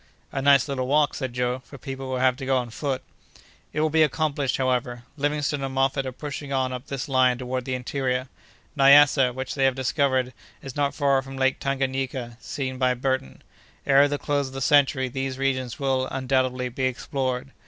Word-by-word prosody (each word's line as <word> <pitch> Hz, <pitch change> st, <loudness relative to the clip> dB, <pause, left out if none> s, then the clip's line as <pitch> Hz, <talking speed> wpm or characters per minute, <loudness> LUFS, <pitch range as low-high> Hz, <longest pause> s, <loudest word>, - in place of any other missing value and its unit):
"A 135 Hz, -, -2 dB
nice 140 Hz, 0 st, +5 dB
little 130 Hz, -3 st, -2 dB
walk," 150 Hz, +2 st, +3 dB
said 130 Hz, -3 st, -4 dB
Joe, 125 Hz, +1 st, -1 dB
"for 130 Hz, +3 st, -13 dB
people 135 Hz, 0 st, -6 dB
who 130 Hz, -, -2 dB
have 130 Hz, 0 st, +2 dB
to 135 Hz, -, -6 dB
go 135 Hz, -1 st, +3 dB
on 120 Hz, -2 st, -3 dB
foot." 135 Hz, +1 st, -3 dB, 0.7 s
"It 150 Hz, -, -1 dB
will 155 Hz, 0 st, +1 dB
be 160 Hz, +1 st, +3 dB
accomplished, 150 Hz, -3 st, +1 dB
however. 125 Hz, -2 st, -1 dB
Livingstone 145 Hz, -1 st, -1 dB
and 135 Hz, -1 st, -4 dB
Moffat 135 Hz, 0 st, +1 dB
are -, -, -3 dB
pushing 140 Hz, +1 st, -7 dB
on 130 Hz, -1 st, 0 dB
up 125 Hz, +1 st, -7 dB
this 135 Hz, -2 st, -4 dB
line 130 Hz, -2 st, +3 dB
toward 130 Hz, 0 st, -4 dB
the 130 Hz, -, -2 dB
interior. 125 Hz, 0 st, -2 dB, 0.5 s
Nyassa, 140 Hz, -2 st, +6 dB
which 130 Hz, +1 st, -5 dB
they 135 Hz, -2 st, +1 dB
have 135 Hz, -1 st, +2 dB
discovered, 130 Hz, -1 st, 0 dB, 0.3 s
is 135 Hz, -2 st, -8 dB
not 145 Hz, -1 st, 0 dB
far 140 Hz, -3 st, +2 dB
from 135 Hz, 0 st, -9 dB
Lake 130 Hz, 0 st, +1 dB
Tanganayika, 130 Hz, -3 st, -2 dB
seen 130 Hz, -2 st, -4 dB
by 125 Hz, -1 st, +2 dB
Burton. 130 Hz, -, -2 dB, 0.4 s
Ere 140 Hz, +1 st, +6 dB
the 145 Hz, 0 st, -2 dB
close 145 Hz, -1 st, -1 dB
of 130 Hz, -, -11 dB
the 135 Hz, -, -4 dB
century 135 Hz, -2 st, +3 dB
these 135 Hz, +1 st, -4 dB
regions 130 Hz, -3 st, -1 dB
will, 130 Hz, -2 st, 0 dB
undoubtedly, 130 Hz, -1 st, 0 dB
be 130 Hz, +2 st, -2 dB
explored. 130 Hz, 0 st, -2 dB
135 Hz, 195 wpm, -25 LUFS, 130-140 Hz, 0.7 s, Nyassa